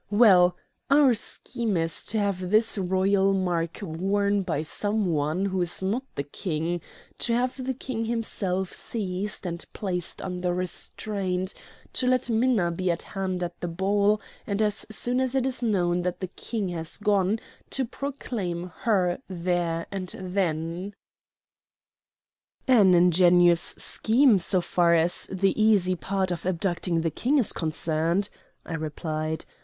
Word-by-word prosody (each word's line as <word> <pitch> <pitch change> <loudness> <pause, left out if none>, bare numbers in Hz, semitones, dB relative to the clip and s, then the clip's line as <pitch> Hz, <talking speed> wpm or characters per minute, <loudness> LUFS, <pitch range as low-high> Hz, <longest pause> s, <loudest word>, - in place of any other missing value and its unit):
Well, 190 -5 +6 0.3
our 280 -2 +6
scheme 230 -1 -2
is 165 0 -1
to 220 - -2
have 195 -3 -1
this 215 +3 +3
royal 190 +1 +2
mark 175 -2 -1
worn 200 +4 0
by 160 -5 -2
some 205 +6 -1
one 160 +2 0
who 190 -2 -1
is 175 +2 0
not 210 +7 0
the 140 - -2
King; 165 +3 -3 0.4
to 235 - 0
have 255 +2 -1
the 260 0 -2
King 230 -3 -4
himself 195 -5 -2
seized 200 -2 -4
and 170 -1 -3
placed 180 -4 -3
under 180 -1 -2
restraint; 185 +1 -3 0.4
to 255 - 0
let 255 -1 +2
Minna 225 -6 +2
be 185 +2 -2
at 170 0 -1
hand 185 -2 -3
at 175 0 -5
the 175 - -3
ball, 200 +4 +2 0.3
and 200 0 -1
as 210 -1 +1
soon 245 +3 0
as 260 0 -1
it 260 -1 +2
is 260 -1 -2
known 180 -6 +1
that 180 0 -2
the 185 - -4
King 210 0 -4
has 165 -2 -4
gone 205 0 +1 0.3
to 265 - -1
proclaim 205 -10 -4
her 190 -5 +2
there 175 -2 -1
and 185 -2 -5
then." 180 0 -2 1.7
"An 205 -8 +6
ingenious 175 0 +5
scheme, 230 -1 +4
so 180 +1 +3
far 170 0 +3
as 170 +2 +3
the 190 0 +2
easy 200 -4 +4
part 190 +1 -1
of 170 -2 -3
abducting 175 -2 0
the 165 -1 -1
King 265 - +1
is 245 -8 +2
concerned," 165 +3 0 0.3
I - - -6
replied. 155 0 -3
185 Hz, 145 wpm, -26 LUFS, 175-210 Hz, 1.7 s, Well